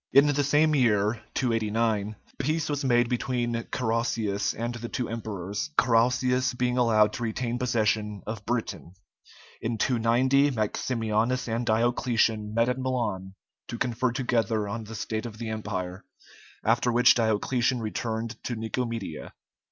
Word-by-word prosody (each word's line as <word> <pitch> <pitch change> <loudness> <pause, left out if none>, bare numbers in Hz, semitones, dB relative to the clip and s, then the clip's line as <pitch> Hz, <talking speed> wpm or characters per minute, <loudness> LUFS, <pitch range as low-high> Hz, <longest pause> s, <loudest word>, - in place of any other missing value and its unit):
In 140 +1 +7
the 145 -1 +2
same 150 +2 +3
year, 110 -4 +2
289, 110 -3 0 0.2
peace 155 +4 0
was 145 -1 -1
made 120 -2 +3
between 120 -1 -1 0.2
Carausius 115 -4 0
and 120 +2 -3
the 120 0 -6
two 125 -3 -2
emperors, 110 - -4
Carausius 125 +1 +3
being 125 0 +1
allowed 110 -3 +4
to - - -5
retain 120 +2 -2
possession 110 -4 0
of 110 0 -5
Britain. 115 -6 -3 0.7
In 115 0 -2
290 130 +4 +3
Maximianus 115 +2 0
and 115 +1 -2
Diocletian 115 -1 +1
met 115 +2 +2
at 125 +1 -1
Milan 115 -8 -2 0.3
to 120 - -5
confer 120 +1 0
together 115 -4 0
on 110 +2 -4
the 110 +1 -8
state 110 +2 -3
of 110 -2 -10
the 115 0 -5
Empire, 95 -4 -4 0.6
after 120 +2 +3
which 125 +1 +6
Diocletian 120 +3 +1
returned 110 +1 -4
to 120 - -2
Nicomedia. 115 -6 -4
115 Hz, 135 wpm, -27 LUFS, 110-125 Hz, 0.7 s, In